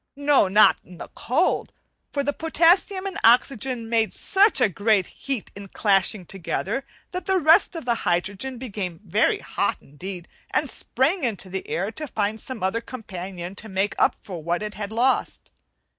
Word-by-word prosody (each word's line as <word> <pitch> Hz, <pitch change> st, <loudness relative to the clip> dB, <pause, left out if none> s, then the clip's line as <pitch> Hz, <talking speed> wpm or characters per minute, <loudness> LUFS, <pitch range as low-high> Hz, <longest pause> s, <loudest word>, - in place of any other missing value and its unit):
No, 285 Hz, -6 st, +3 dB
not 210 Hz, +3 st, +6 dB
in 180 Hz, -, -14 dB
the -, -, -9 dB
cold! -, -, 0 dB, 0.4 s
for 280 Hz, -, -1 dB
the 285 Hz, +1 st, 0 dB
potassium 350 Hz, +5 st, +2 dB
and 390 Hz, -, -4 dB
oxygen 245 Hz, 0 st, +3 dB
made 225 Hz, -1 st, +1 dB
such 405 Hz, +2 st, +3 dB
a -, -, +5 dB
great 200 Hz, 0 st, +2 dB
heat 270 Hz, +1 st, -5 dB
in 200 Hz, 0 st, -9 dB
clashing 195 Hz, -1 st, +1 dB
together 195 Hz, +7 st, -3 dB, 0.3 s
that 365 Hz, +2 st, -5 dB
the 385 Hz, -1 st, +3 dB
rest 330 Hz, +2 st, +5 dB
of 330 Hz, -, -6 dB
the 240 Hz, -, +2 dB
hydrogen 195 Hz, +9 st, -1 dB
became 200 Hz, -9 st, -5 dB
very -, -, +2 dB
hot -, -, -2 dB
indeed, 175 Hz, +5 st, -9 dB, 0.2 s
and -, -, +1 dB
sprang 305 Hz, +7 st, 0 dB
into 200 Hz, -6 st, -3 dB
the 190 Hz, 0 st, -5 dB
air 195 Hz, +5 st, -1 dB
to 305 Hz, +6 st, -6 dB
find 215 Hz, -2 st, -2 dB
some 255 Hz, -7 st, -7 dB
other 190 Hz, +5 st, 0 dB
companion 185 Hz, -7 st, -7 dB
to 210 Hz, +3 st, -8 dB
make 195 Hz, +1 st, 0 dB
up -, -, +3 dB
for 180 Hz, -5 st, -7 dB
what 170 Hz, +5 st, -1 dB
it 210 Hz, 0 st, -5 dB
had 210 Hz, -1 st, -6 dB
lost. 245 Hz, +4 st, 0 dB
220 Hz, 175 wpm, -24 LUFS, 190-270 Hz, 0.4 s, not